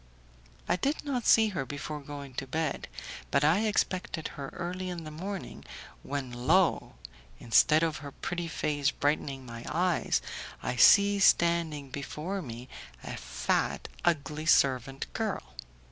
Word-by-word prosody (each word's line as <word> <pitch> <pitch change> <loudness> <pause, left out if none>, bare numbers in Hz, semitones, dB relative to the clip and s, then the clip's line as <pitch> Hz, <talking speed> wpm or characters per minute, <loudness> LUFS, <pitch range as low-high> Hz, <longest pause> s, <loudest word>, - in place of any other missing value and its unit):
I - - +2
did 280 +9 -1
not 255 -5 -1
see 220 -1 +6
her 175 -9 -2
before 145 +3 -5
going 140 -1 -8
to 135 - -9
bed, 155 +1 -2 0.4
but 140 - +2
I 180 +9 +4
expected 185 -5 -1
her 140 -1 -7
early 180 +1 -4
the - - -4
next 155 -1 -8
morning, 195 0 -6 0.4
when 140 -3 -4
lo! 145 - +2 0.4
instead 155 +7 +4
of 160 -2 0
her 140 -1 -8
pretty 175 +4 -4
face 145 -3 0
brightening 140 -2 -1
my 115 -1 -8
eyes, 180 0 +1 0.4
I 125 - -1
see 200 - +7
standing 170 -7 +3
before 155 +8 -4
me 120 -4 -8 0.4
a - - -5
fat, - - -1
ugly 155 -1 0
servant 135 -3 +3
girl! 65 +1 -3
155 Hz, 140 wpm, -29 LUFS, 140-180 Hz, 0.4 s, see